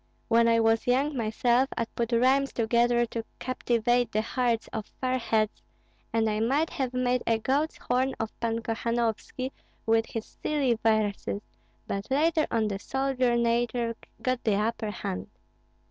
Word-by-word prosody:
When 230 0 +5
I 230 0 +4
was 225 0 +2
young 275 +4 +2
myself, 240 +3 +2
I 230 - +1
put 235 +1 -3
rhymes 260 +4 +3
together 240 +1 +2
to 230 0 -5
captivate 240 -1 +1
the 215 0 +1
hearts 235 -1 0
of 220 -2 -4
fair 255 0 0
heads, 220 -2 0 0.5
and 225 -1 +2
I 215 0 0
might 275 +8 +1
have 265 -5 -2
made 250 0 +1
a 230 - +3
goat's 280 +7 0
horn 260 +2 0
of 225 -1 -2
Pan 230 0 -1
Kohanovski 230 +3 -2 0.3
with 225 0 +3
his 225 -1 -5
silly 285 -5 0
verses, 215 -2 0 0.4
but 200 0 -4
later 310 +3 +2
on 225 -2 +1
the 200 -2 -3
soldier 260 0 0
nature 235 0 +1 0.3
got 255 -1 0
the 215 -3 +2
upper 220 +1 -1
hand." 90 - -4
235 Hz, 155 wpm, -28 LUFS, 225-255 Hz, 0.5 s, When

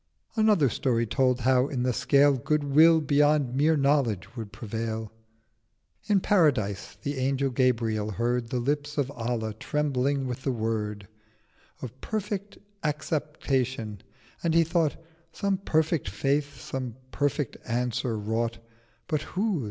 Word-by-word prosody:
Another 215 - +4
Story 115 -1 0
told 125 +2 +1
how 130 +1 +3
in 130 -4 -2
the 125 0 +1
Scale 140 +3 +4
Good 150 +4 0
Will 160 +3 +6
beyond 145 -2 +3
mere 150 +4 +3
Knowledge 135 -7 +1
would 110 -4 -6
prevail. 110 -1 -4 0.9
700 210 - -6
In 195 - +5
Paradise 125 - +1
the 145 0 -2
Angel 135 +1 +1
Gabriel 115 -4 +1
heard 120 +2 -1
The 125 - -1
Lips 145 +4 -2
of 140 -1 0
Allah 115 -3 -2
trembling 140 +2 0
with 125 0 -4
the 135 - 0
Word 110 -3 -2 0.8
Of 130 +1 -8
perfect 205 -2 -4 0.3
Acceptation: 135 - -2 0.4
and 165 -1 +1
he 165 - +6
thought 165 -2 +1 0.4
'Some 200 -1 0
perfect 160 - +1
Faith 140 +6 -1
such 135 - -4 0.3
perfect 145 -2 -1
Answer 120 0 -1
wrought, 115 +2 -1 0.5
But 155 -2 0
whose?' 195 +2 -1
135 Hz, 135 wpm, -27 LUFS, 115-150 Hz, 0.9 s, Will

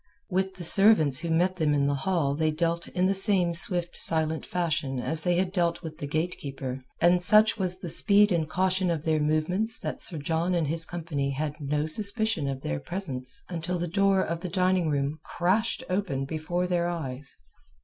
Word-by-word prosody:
With 190 +1 -1
the 180 - -8
servants 170 -7 +5
who 170 +1 -4
met 180 +3 +1
them 150 -3 +1
in 140 -1 +1
the 145 - +1
hall 145 -1 0
they 155 +2 0
dealt 170 +2 -1
in 180 +1 -1
the 195 - +2
same 190 -3 +3
swift 175 -1 +1
silent 160 -1 +1
fashion 155 -7 -2
as 155 +4 -2
they 175 -1 +1
had 185 +1 0
dealt 170 -2 0
with 155 -1 -8
the 145 - -4
gatekeeper, 140 -5 -4 0.2
and 175 +1 +4
such 215 +4 +5
was 185 -1 0
the 185 - -8
speed 205 +4 +3
and 160 -3 0
caution 185 +2 0
of 165 -3 -2
their 160 -1 +1
movements 155 +9 +1
that - - -5
Sir 165 - +3
John 165 +4 -1
and 170 -2 +1
his 165 +2 -2
company 155 -5 -3
had 145 +2 -3
no 145 +1 -1
suspicion 205 -1 -1
of 135 -1 -4
their 75 - -3
presence 135 - -3
until 175 +1 -3
the 175 0 -3
door 195 +2 +2
of 165 0 -3
the 180 - -5
dining 185 -2 +1
room 145 +1 -1
crashed 215 +8 0
open 180 -8 -2
before 165 +4 -3
their 175 -1 0
eyes. 145 -5 -5
170 Hz, 195 wpm, -27 LUFS, 155-185 Hz, 0.2 s, servants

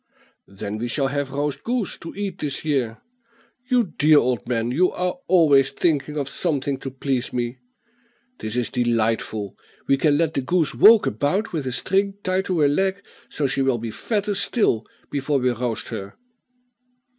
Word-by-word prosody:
"Then 100 +2 -6
we 120 - -2
shall 135 +2 0
have 145 0 -2
roast 145 +1 -3
goose 240 -4 -1
to 170 - -8
eat 195 -2 -4
this 145 +1 -2
year. 130 -7 0 0.7
You 250 -2 +4 0.2
dear 155 +1 +6
old 125 -6 +1
man, 120 -1 -1
you 180 +8 +3
are 180 +7 -2
always 145 -7 +5
thinking 150 0 0
of 140 -2 -1
something 140 -3 -1
to 135 - -5
please 130 -1 -2
me. 120 0 -3 0.8
This 110 +1 -5
is 125 -2 -1
delightful. 115 -4 -1 0.3
We 135 - +3
can 145 +1 +3
let 160 0 +1
the 135 - 0
goose 160 0 +1
walk 220 0 +7
about 145 - -1
with 150 -5 -2
a - - -1
string 195 +9 0
tied 185 +1 0
to 180 -4 0
her 145 - +5
leg, 190 +7 0 0.3
so 150 - -2
she 135 0 0
will 135 -2 +2
be 115 -1 -5
fatter 205 - -2
still 195 - +1 0.2
before 145 0 0
we 125 -1 +1
roast 120 -1 -3
her." 100 -4 -6
140 Hz, 175 wpm, -23 LUFS, 125-175 Hz, 0.8 s, walk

